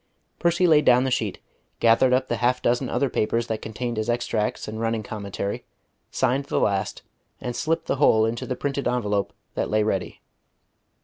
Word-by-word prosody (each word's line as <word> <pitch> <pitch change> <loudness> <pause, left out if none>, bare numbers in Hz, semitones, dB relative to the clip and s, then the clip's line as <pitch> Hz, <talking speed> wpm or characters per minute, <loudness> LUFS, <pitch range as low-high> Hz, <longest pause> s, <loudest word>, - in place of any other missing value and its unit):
Percy 170 +1 +2
laid 155 -3 +5
down 125 -2 +5
the 130 - -1
sheet, - - -1 0.4
gathered 115 +3 +4
up 130 +1 +2
the 120 - -1
half 125 +2 +2
dozen 120 +2 0
other 140 - +1
papers 115 -1 0
that 110 -2 -3
contained 120 +1 -4
his 110 +2 -2
extracts 120 -2 -1
and 110 +1 -5
running 115 -1 -1
commentary, 100 -1 -4 0.5
signed 130 +2 0
the - - 0
last, 100 -1 -1 0.4
and 120 -1 -4
slipped 165 +1 -1
the - - -1
whole 110 -6 +5
into 115 +1 -3
the 130 - -2
printed 140 +1 -2
envelope 105 -5 0 0.2
that - - -2
lay 110 0 +2
ready. 95 -3 -2
120 Hz, 180 wpm, -24 LUFS, 110-130 Hz, 0.5 s, laid